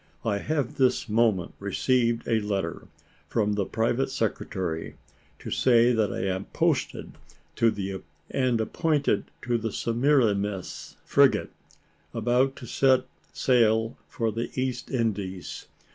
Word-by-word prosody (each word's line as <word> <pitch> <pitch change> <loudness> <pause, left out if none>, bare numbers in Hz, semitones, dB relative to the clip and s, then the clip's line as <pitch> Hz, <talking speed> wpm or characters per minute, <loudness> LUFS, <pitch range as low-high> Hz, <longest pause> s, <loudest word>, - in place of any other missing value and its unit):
I 100 -3 +1
have 145 -1 -2
this 130 -2 +2
moment 110 -5 +2
received 115 +3 +1
a 115 -1 +2
letter 100 -5 -3 0.4
from 105 -2 +1
the 100 -2 -1
private 120 +4 0
secretary, 95 -8 -3 0.4
to - - -8
say 120 -1 +4
that 110 -3 +1
I - - -2
am 95 0 -2
posted - - -1 0.4
and 115 +4 -1
appointed 150 +5 +1 0.2
to 120 -2 0
the 115 0 -3
Semiramis 115 -7 0
frigate, - - +3 0.6
about 125 +4 +2
to 125 - -9
set 130 +2 +3 0.3
sail 115 -2 +2
for 115 -1 -1
the 115 +2 -3
East 130 -1 -2
Indies. 100 -7 -3
115 Hz, 115 wpm, -26 LUFS, 100-125 Hz, 0.6 s, say